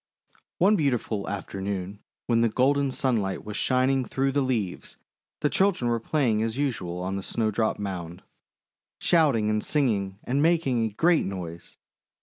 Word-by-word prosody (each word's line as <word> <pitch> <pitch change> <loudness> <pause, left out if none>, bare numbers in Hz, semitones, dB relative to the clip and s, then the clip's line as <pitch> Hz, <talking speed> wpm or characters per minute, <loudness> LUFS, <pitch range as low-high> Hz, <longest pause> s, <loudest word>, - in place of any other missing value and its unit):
One 200 +5 +4
beautiful 125 - -1
afternoon 100 0 -4 0.3
when 115 -1 +2
the 115 - +3
golden 140 +4 +2
sunlight 110 -9 -1
was 105 -1 -6
shining 130 +2 +2
through 135 +2 -1
the 140 +1 +1
leaves, 115 -9 -2 0.4
the 150 - +3
children 185 -12 +2
were 115 - +1
playing 115 -3 +1
as 115 +2 -2
usual 90 -11 -2
on 95 +1 -2
the - - -3
Snowdrop 110 +1 -1
Mound, 90 -4 -5 0.8
shouting 140 -11 +3
and 105 0 0
singing 105 -10 0
and 135 +3 0
making 155 -8 +2
a - - -1
great 165 +11 +2
noise. 85 -3 -7
115 Hz, 145 wpm, -26 LUFS, 100-135 Hz, 0.8 s, One